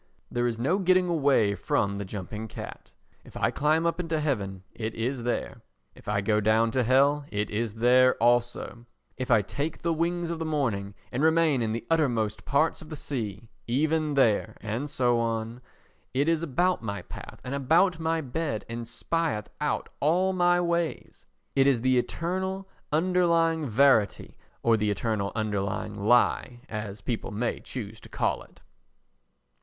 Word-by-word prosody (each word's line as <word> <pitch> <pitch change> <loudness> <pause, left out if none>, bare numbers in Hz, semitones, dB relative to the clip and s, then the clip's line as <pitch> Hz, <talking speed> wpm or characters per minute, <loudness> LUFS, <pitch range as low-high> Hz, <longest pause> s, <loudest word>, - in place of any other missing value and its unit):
There 120 0 +1
is 115 -2 -2
no 140 - +1
getting 185 -1 +3
away 140 -11 +3
from 100 0 0
the 100 - -4
jumping 105 +3 -6
cat—if - - -11
I - - +1
climb 155 +3 +2
up 170 +1 0
into 165 -3 -1
heaven, 100 -11 -2
it 110 -1 -4
is 120 +3 -2
there; 120 +1 -3 0.3
if - - -18
I 105 0 +1
go 105 +2 +2
down 110 +2 +3
to 130 - +1
hell, 140 +4 +3
it 105 0 -2
is 110 0 -2
there 125 +2 +5
also; 120 0 0 0.3
if 130 +1 -4
I 115 -4 +5
take 145 - -4
the 170 0 +1
wings 170 +1 -1
of 165 - -4
the - - -2
morning 115 -11 -1 0.2
and 125 - -2
remain 160 -4 +3
in 110 -1 0
the 115 +1 -4
uttermost 120 -10 0
parts 150 +3 +1
of 155 - -12
the 155 - -5
sea, 115 -8 -5 0.2
even 150 +4 +1
there, 110 -4 +2
and 115 +7 -3
so 120 -3 +2
on; 115 +1 -2 0.5
it 140 +3 +2
is 165 -1 +2
about 175 +4 +1
my 100 -5 -4
path - - -10
and 125 - -5
about 165 +6 +3
my 165 0 0
bed 140 -4 -3
and 115 0 -5
spieth 160 -3 -2
out - - -1
all 180 +6 +2
my 175 -1 +3
ways. 170 - -2 0.3
It 135 0 +4
is 130 -4 +3
the 130 0 +3
eternal 190 +7 -3 0.2
underlying 165 -1 +2
verity 115 -3 +3 0.3
or 115 -1 +4
the 105 0 0
eternal 105 -1 -1
underlying 105 -1 -2
lie, 120 +3 +2
as 105 -2 -5
people 115 +2 -3
may 115 +3 -2
choose 110 -3 -7
to - - -14
call - - -1
it. - - -18
125 Hz, 165 wpm, -27 LUFS, 110-160 Hz, 0.5 s, there